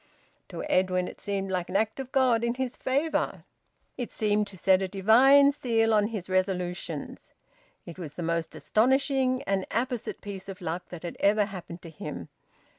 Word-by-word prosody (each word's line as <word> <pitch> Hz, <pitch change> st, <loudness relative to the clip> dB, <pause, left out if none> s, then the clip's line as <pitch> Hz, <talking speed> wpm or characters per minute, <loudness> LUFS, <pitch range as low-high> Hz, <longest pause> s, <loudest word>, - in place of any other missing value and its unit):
To -, -, -6 dB
Edwin, 185 Hz, -1 st, +1 dB
it -, -, -10 dB
seemed 195 Hz, -1 st, -2 dB
like 180 Hz, -2 st, -2 dB
an -, -, -6 dB
act 220 Hz, +5 st, +1 dB
of 265 Hz, -1 st, -6 dB
God 250 Hz, -4 st, +3 dB
in 235 Hz, 0 st, 0 dB
his 260 Hz, -1 st, -3 dB
favour. 280 Hz, +5 st, -1 dB, 0.5 s
It 245 Hz, -, -4 dB
seemed 210 Hz, -1 st, +1 dB
to 195 Hz, -, -12 dB
set 190 Hz, +1 st, +4 dB
a 190 Hz, -, 0 dB
divine 250 Hz, +9 st, +6 dB
seal 225 Hz, -5 st, +1 dB
on 210 Hz, -1 st, +3 dB
his 210 Hz, -5 st, -5 dB
resolutions. 180 Hz, -4 st, -3 dB, 0.5 s
It 170 Hz, +1 st, -10 dB
was 155 Hz, -5 st, -7 dB
the 175 Hz, -, -4 dB
most 165 Hz, 0 st, -2 dB
astonishing 260 Hz, +2 st, +2 dB
and 195 Hz, -1 st, -1 dB
apposite 240 Hz, 0 st, -2 dB
piece 195 Hz, -1 st, -7 dB
of 195 Hz, 0 st, -7 dB
luck 175 Hz, 0 st, -4 dB
that 175 Hz, -1 st, -9 dB
had 170 Hz, -, -6 dB
ever 205 Hz, +1 st, +3 dB
happened 180 Hz, -2 st, -9 dB
to 165 Hz, -, -9 dB
him. 90 Hz, -, -7 dB
200 Hz, 180 wpm, -27 LUFS, 180-240 Hz, 0.5 s, divine